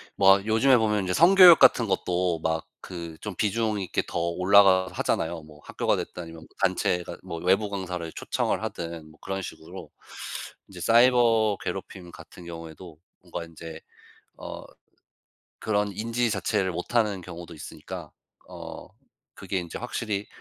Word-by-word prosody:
막 95 +1 +5
요즘에 115 +4 +4
보면 105 -3 +1
이제 90 - -1
성교육 175 - +8
같은 120 - +5
것도 90 -3 0
막 80 0 -2 0.2
그 85 -3 -7
좀 105 -3 -6
비중 110 +1 0
있게 95 -3 -1
더 - - -4
올라가 95 +2 +4
하잖아요. 80 0 -2
뭐 75 -1 -16
학교가 - - -1
됐든 90 - -6
아니면 80 -1 -11 0.2
단체가 90 -1 0
뭐 90 -2 -6
외부 95 +4 +2
강사를 90 -4 -5
초청을 - - -2
하든 85 -2 -6
뭐 80 - -21
그런 95 0 -4
식으로 80 - -10 0.8
이제 90 -3 -12
사이버 115 0 +4
괴롭힘 90 -1 -6
같은 90 +1 -13
경우에도 85 0 -10 0.2
뭔가 85 - -7
인제 80 -1 -10 0.6
어 - - -8 1.0
그런 105 -1 0
인지 115 +4 -1
자체를 100 -3 0
못하는 105 +3 0
경우도 85 -1 -10
있으니까 80 - -9 0.5
어 - - -9 0.5
그게 95 - -4
인제 85 -2 -7
확실히 110 -4 -3
95 Hz, 305 characters per minute, -26 LUFS, 85-105 Hz, 1.0 s, 성교육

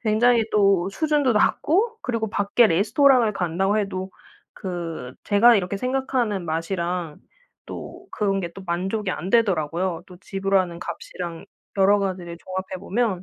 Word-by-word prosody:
굉장히 230 +1 +3
또 195 -3 +3
수준도 295 -1 +1
낮고 405 - +2
그리고 230 -3 -2
밖에 205 +3 +3
레스토랑을 225 - +4
간다고 190 +3 0
해도 190 -2 -3 0.4
그 165 -8 -6
제가 230 +4 +6
이렇게 195 +1 -1
생각하는 250 -6 -1 1.2
또 - - -9
그런 195 -2 0
게 170 -2 -5
또 195 - -10
만족이 190 +4 -2
안 180 +2 -4
되더라고요. 175 -5 +1
또 180 - -13
지불하는 195 -3 -1
값이랑 175 -1 -7 0.3
여러 200 +2 +5
가지를 180 -3 -4
종합해 185 +1 -5
보면. 205 -4 -1
195 Hz, 300 characters per minute, -23 LUFS, 180-225 Hz, 1.2 s, 제가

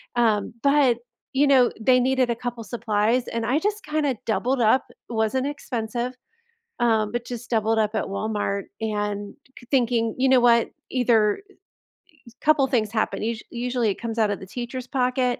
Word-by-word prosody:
um, 220 -4 +2
but, 280 -4 +4 0.4
you 280 +2 +3
know, 260 -3 +5
they 250 +2 +5
needed 255 -1 +2
a 235 - +1
couple 240 -1 -5
supplies, 230 +1 0
and 230 -1 -2
I 260 +5 +2
just 415 +3 -2
kinda 300 -4 0
doubled 245 +3 0
up, 225 +4 +4
it - - -24 0.2
wasn't 225 +5 0
expensive, 245 -3 -3 0.7
um, 220 -3 +2
but 240 0 -3
just 245 -1 -7
doubled 225 -1 +1
up 215 0 +1
at - - 0
Walmart 200 -1 -2 0.2
and 205 -1 -3 0.4
thinking, 235 -3 +1
"You 265 +1 +2
know 260 -1 +6
what?" 235 -1 +4 0.2
Either 230 - +2
i - - -20 0.7
y - - -12
couple 295 -3 +4
things 220 -6 0
happen, 220 -2 -1
us 225 0 -2
usually, 245 -2 -1
it - - -7
comes 230 -1 -4
out 210 -2 +3
of 200 - -3
the 190 - -10
teacher's 245 +3 -6
pocket, 250 -1 0
240 Hz, 175 wpm, -24 LUFS, 220-255 Hz, 0.7 s, know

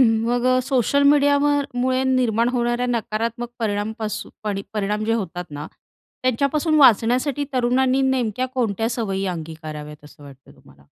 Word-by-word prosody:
मग 235 +1 +2 0.2
सोशल 270 +1 +1
मीडियावर 285 0 +4
मुळे 255 +1 +1
निर्माण 245 -3 +2
होणाऱ्या 240 0 0
नकारात्मक 235 0 -2
परिणामपासून 215 -1 -3
परिणाम 210 +1 -1
जे 225 - 0
होतात 180 -5 -4
ना, 145 +1 -6 0.6
त्यांच्यापासून 280 +5 +1
वाचण्यासाठी 255 +3 +4
तरुणांनी 255 +1 +2
नेमक्या 250 -1 -1
कोणत्या 225 -3 0
सवयी 195 -5 -2
अंगीकाराव्यात 155 -3 -7
असं 150 0 -16
वाटतं 135 -2 -15
तुम्हाला? 70 0 -21
230 Hz, 120 wpm, -22 LUFS, 205-255 Hz, 0.6 s, मीडियावर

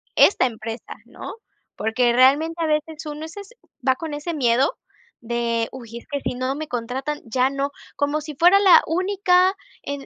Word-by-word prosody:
esta 380 - +5
empresa, 225 -1 -6
¿no? - - -9 0.4
Porque 235 +2 +1
realmente 295 +7 +3
a - - +1
veces 305 +1 -2
uno 300 +1 -6
es 320 +4 -11
es 400 -1 -9 0.4
va 260 - +5
con 320 0 -6
ese 300 +4 -4
miedo 255 -2 +2 0.4
de: 235 -1 -1
"Uy 235 -3 -9
es - - -11
que 285 - -1
si - - -3
no 255 +2 -2
me 310 +1 -5
contratan, 255 +5 -4
ya 250 +3 +1
no", 275 +1 -2 0.2
como 290 +1 0
si 300 -1 -8
fuera 355 +6 +6
la 385 -3 +7
única, 370 +1 +2 0.3
em 285 -1 -5
285 Hz, 180 wpm, -22 LUFS, 245-320 Hz, 0.4 s, la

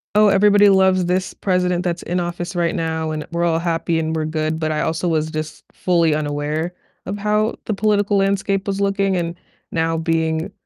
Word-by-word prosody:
"Oh, 210 0 +6
everybody 205 +1 +5
loves 190 -1 +4
this 185 +1 -1
president 180 -2 0
that's 175 -1 -2
in 180 +1 -1
office 175 +1 -4
right 175 +2 0
now 160 -2 -2
and 155 -1 -4
we're 170 0 0
all 165 -1 +1
happy 165 -1 0
and 160 0 -2
we're 155 -1 -1
good," 155 0 -2
but 155 -1 -1
I 150 - -1
also 165 +2 -1
was 155 -1 0
just 155 0 -5
fully 170 -4 +2
unaware 150 +3 -2 0.3
of 205 - -4
how 210 +1 0
the 215 - -1
political 205 0 +1
landscape 195 0 0
was 200 0 -1
looking, 195 -1 +1
and 170 -1 -2 0.4
now 165 0 0
being 160 +2 -1
175 Hz, 190 wpm, -20 LUFS, 160-195 Hz, 0.4 s, Oh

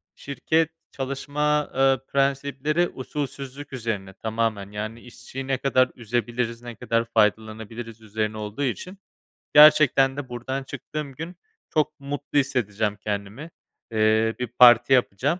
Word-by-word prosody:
şirket 155 +4 0 0.2
çalışma, 145 +2 -1
eee, 135 0 +4
prensipleri 140 +4 0
usulsüzlük 140 +1 -6
üzerine 110 -6 -4
tamamen, 110 -1 -2
yani, 110 +2 -5
işçiyi 130 +2 -9
ne 135 -1 +1
kadar 130 -1 +2
üzebiliriz, 120 0 -2
ne 120 -1 -8
kadar 115 0 0
faydalanabiliriz 110 +1 -1
üzerine 110 0 -3
olduğu 105 +6 -4
için, 180 - -3 0.6
gerçekten 145 -3 +7
de 145 -3 -5
buradan 125 +3 -4
çıktığım 140 +2 -6
gün 165 +6 -7 0.3
çok 155 0 0
mutlu 145 +1 -2
hissedeceğim 110 -6 -1
kendimi. 105 +8 -5 0.4
Eee, 110 0 +2
bir 125 - -2
parti 120 +1 +6
yapacağım. 130 - +1
125 Hz, 120 wpm, -24 LUFS, 110-140 Hz, 0.6 s, gerçekten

